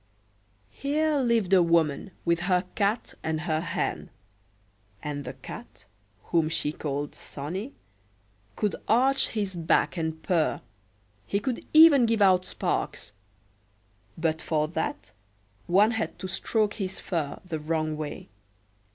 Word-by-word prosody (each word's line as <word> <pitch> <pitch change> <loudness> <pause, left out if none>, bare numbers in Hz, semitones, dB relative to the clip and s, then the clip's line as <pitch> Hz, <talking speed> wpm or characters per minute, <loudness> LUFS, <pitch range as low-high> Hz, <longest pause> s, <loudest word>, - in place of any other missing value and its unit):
Here 300 +2 0
lived 230 -7 +2
a 185 - +7
woman, 165 0 +2 0.2
with 170 0 +2
her 180 0 +2
Cat 205 +3 0
and 160 -1 -2
her 155 0 0
Hen. 165 - -2 0.9
And 145 -1 -4
the 125 - -5
Cat, - - -11 0.4
whom 165 -2 +2
she 150 -2 0
called 145 -1 -4
Sonnie, 185 - -6 0.8
could 210 - 0
arch 265 +4 +3
his 200 -4 -2
back 165 +2 +1
and 160 -1 -3
purr, 170 -4 +1 0.7
he 200 - 0
could 250 +2 -3
even 310 -6 +8
give 225 -1 +1
out 185 -2 +5
sparks; 100 - -3 1.0
but 160 -1 0
for 155 -1 0
that 160 -9 -3 0.6
one 200 +5 +5
had 225 -2 -3
to 190 - -5
stroke 210 +3 0
his 190 0 -3
fur 160 -6 -3
the 165 -4 -4
wrong 155 0 -1
way. 150 -1 -6
180 Hz, 130 wpm, -27 LUFS, 155-215 Hz, 1.0 s, even